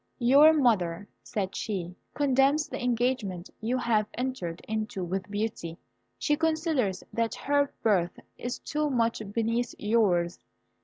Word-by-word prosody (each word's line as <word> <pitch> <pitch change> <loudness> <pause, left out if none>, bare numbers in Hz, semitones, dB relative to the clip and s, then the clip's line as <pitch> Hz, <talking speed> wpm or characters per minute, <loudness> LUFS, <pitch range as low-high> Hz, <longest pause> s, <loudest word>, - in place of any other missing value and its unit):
"Your 275 +5 +7
mother," 205 - +2
said 195 -3 -3
she, 180 -5 -3 0.2
"condemns 280 +2 +3
the 290 - -5
engagement 235 -7 -1
you 235 +3 -1
have 220 -4 +1
entered 245 -10 -3
into 215 -2 -3
with 185 +2 -3
Beauty. 205 -5 -3 0.4
She 295 - +1
considers 315 - 0
that 230 -1 0
her 285 0 +1
birth 185 -6 +2 0.2
is 245 +1 -4
too 300 0 -2
much 230 -4 +1
beneath 230 +2 -1
yours. 195 -6 +2
230 Hz, 125 wpm, -28 LUFS, 195-265 Hz, 0.4 s, Your